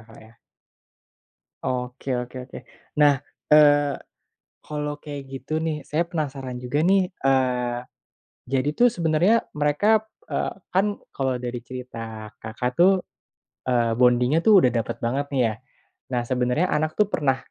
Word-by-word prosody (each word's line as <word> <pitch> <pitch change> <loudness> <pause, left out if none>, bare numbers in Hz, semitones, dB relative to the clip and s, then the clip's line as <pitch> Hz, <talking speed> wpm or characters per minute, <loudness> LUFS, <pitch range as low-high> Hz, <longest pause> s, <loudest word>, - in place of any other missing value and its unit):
Kak, 110 - -15
ya? 110 - -18 1.3
Oke 125 +1 -2
oke 125 +1 -5
oke - - -8 0.4
nah, 145 -2 +5 0.3
eee, 145 -1 +6 0.7
kalau 150 -1 -4
kayak 145 -2 -7
gitu 135 +4 -4
nih 160 -2 -2
saya 165 +3 -1
penasaran 140 -6 -4
juga 125 +4 -1
nih, 185 +2 +3
eee, 125 -5 +1 0.7
jadi 135 +1 +1
tuh 245 +10 +5
sebenernya 180 +2 +2
mereka, 150 +10 +3 0.2
eee, - - -2 0.2
kan 200 +2 +2 0.2
kalau 130 -2 -1
dari 120 0 -4
cerita 115 -3 -8
Kakak 120 +3 -3
tuh, 185 +1 +5 0.7
eee, 120 -2 +2
bonding-nya 125 +5 +3
tuh 200 -4 +6
udah 125 - +2
dapet 115 -3 -2
banget 130 +5 -1
nih 135 -3 0
ya, - - -11 0.5
nah 125 -2 0
sebenernya 125 +7 +1
anak 155 +1 -1
tuh 210 - +5
pernah, 135 -3 +2
135 Hz, 135 wpm, -24 LUFS, 125-155 Hz, 1.3 s, eee